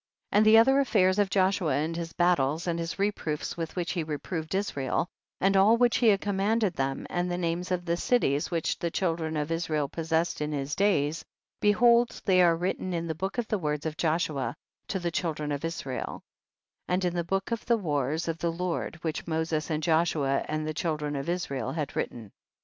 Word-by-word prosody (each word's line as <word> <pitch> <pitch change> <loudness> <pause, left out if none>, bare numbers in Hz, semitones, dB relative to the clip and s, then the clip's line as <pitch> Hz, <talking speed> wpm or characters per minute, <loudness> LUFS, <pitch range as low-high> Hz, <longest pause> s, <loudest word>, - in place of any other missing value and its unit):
48. - - +3
And 215 - +5
the 220 +1 +8
other 265 +5 +6
affairs 200 -7 +3
of 205 -2 +3
Joshua 190 -5 +2
and 155 +3 -1
his 165 -1 -4
battles 170 -3 +1
and 170 -1 -1
his 165 0 -4
reproofs 195 -7 -2
with 165 -1 -5
which 175 -2 -2
he 175 - -1
reproved 155 +2 -4
Israel, 165 -5 -1 0.3
and 195 +1 +3
all 205 +4 +6
which 245 0 +3
he 240 - +3
had 200 -3 +5
commanded 205 +1 +1
them, 135 -2 -2
and 175 0 -1
the 175 - -1
names 175 0 -2
of 180 -1 -1
the 170 -1 +1
cities 160 - +1
which 165 -3 -1
the 170 - -1
chil 170 -1 0
dren 160 -1 -3
of 150 +2 -2
Israel 160 -3 0
possessed 165 +2 -1
in 150 0 -1
his 140 0 -3
days, 160 -6 +1 0.4
behold 235 +3 +4
they 185 -2 +5
are 170 -2 +5
written 180 +1 -2
in 165 0 -2
the 160 - -2
book 190 +8 -4
of 240 -2 -1
the 215 - -1
words 150 -2 -2
of 155 -1 -2
Joshua 155 -7 0 0.3
to 195 - -2
the 175 -2 -2
children 155 -3 -2
of 145 +1 -3
Israel, 160 -6 -4 0.6
and 180 +1 0
in 175 - 0
the 175 -1 -1
book 195 +5 -2
of 230 -2 -2
the 235 -1 +4
wars 150 - -1
of 165 0 -2
the 170 - 0
Lord, 175 0 -3
which 160 0 -3
Moses 160 -1 -1
and 155 -1 -1
Joshua 155 -4 +2
and 155 0 -2
the 155 - -2
children 150 -2 -2
of 140 +4 -3
Israel 140 -7 -2
had 150 -3 -3
writ - - 0
ten. 110 -4 -11
170 Hz, 210 wpm, -28 LUFS, 155-190 Hz, 0.6 s, the